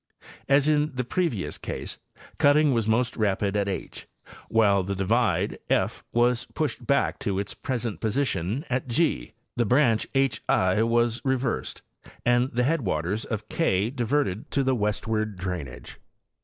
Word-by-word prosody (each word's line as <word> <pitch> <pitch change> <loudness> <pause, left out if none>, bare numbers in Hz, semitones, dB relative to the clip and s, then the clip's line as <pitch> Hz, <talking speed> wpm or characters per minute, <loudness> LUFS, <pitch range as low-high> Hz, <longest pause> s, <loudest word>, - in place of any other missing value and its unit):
As 140 +1 +4
in 150 -1 +2
the 125 - -1
previous 135 - -1
case, - - -5 0.4
cutting 145 0 +5
was 115 -3 0
most 115 +3 +1
rapid 100 -2 0
at 100 -1 +1
h, 95 - -5 0.2
and - - -16
while 105 -3 +4
the 100 +2 -3
divide 95 -1 +1
f - - 0
was 120 +1 +2
pushed 155 -5 -2
'back 140 0 +1
to 100 -5 -2
its 100 0 -3
present 120 -5 -3
posi 125 +6 +1
tion 100 - -2
at 125 +1 -2
g, 120 - 0 0.2
the 120 - +2
branch 120 -3 +3
h 135 -5 +2
i 95 +3 +3
was 120 +1 +2
reversed 130 -2 -1 0.4
and 120 +2 +3
the 125 +1 +1
headwaters 105 - 0
of 110 -2 -4
K 105 - +1
diverted 125 -5 -1
to 140 - +1
the 130 0 +2
westward 110 -1 -1
drainage. 90 -8 -6
115 Hz, 155 wpm, -26 LUFS, 100-135 Hz, 0.4 s, cutting